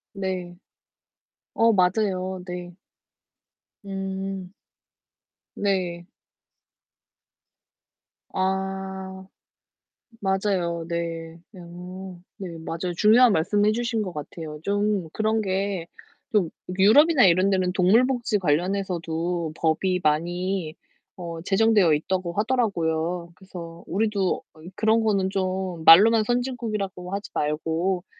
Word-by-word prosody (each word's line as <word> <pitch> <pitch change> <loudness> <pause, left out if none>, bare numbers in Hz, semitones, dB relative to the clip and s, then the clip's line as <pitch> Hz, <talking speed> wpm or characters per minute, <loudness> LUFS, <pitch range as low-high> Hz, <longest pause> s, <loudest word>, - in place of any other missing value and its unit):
네. 185 -2 -4 1.0
어 230 0 +4
맞아요 185 -1 +1
네. 180 0 -6 1.1
음. 195 -1 -5 1.0
네. 180 -4 -1 2.3
아. 190 0 -3 0.9
맞아요. 190 -4 -1
네. 165 -1 -4 0.2
어 180 +1 -9 0.2
네. 175 -4 -7
맞아요. 170 +2 -4
중요한 230 +3 +6
말씀 205 +5 +2
해 215 - +4
주신 235 -1 -1
것 185 -3 -4
같아요. 150 +1 -7
좀 205 -3 0
그런 220 0 +1
게 190 -3 -2 0.5
좀 185 -6 +3 0.3
유럽이나 280 - +6
이런 185 +2 +4
데는 185 -2 +1
동물 210 +7 +4
복지 240 -5 0
관련해서도 170 -1 -1
법이 180 +3 +1
많이 175 +2 -1 0.4
어 170 -2 -6
제정되어 195 -3 +3
있다고 175 +3 -1
하더라고요. 175 -6 -1
그래서 170 -3 -10
우리도 200 -1 0 0.4
그런 220 +1 +3
거는 195 -3 +1
좀 185 -3 -2
말로만 215 +7 +8
선진국이라고 215 -7 -3
하지 200 +1 -5
말고 165 +5 -1
190 Hz, 200 characters per minute, -24 LUFS, 170-205 Hz, 2.3 s, 말로만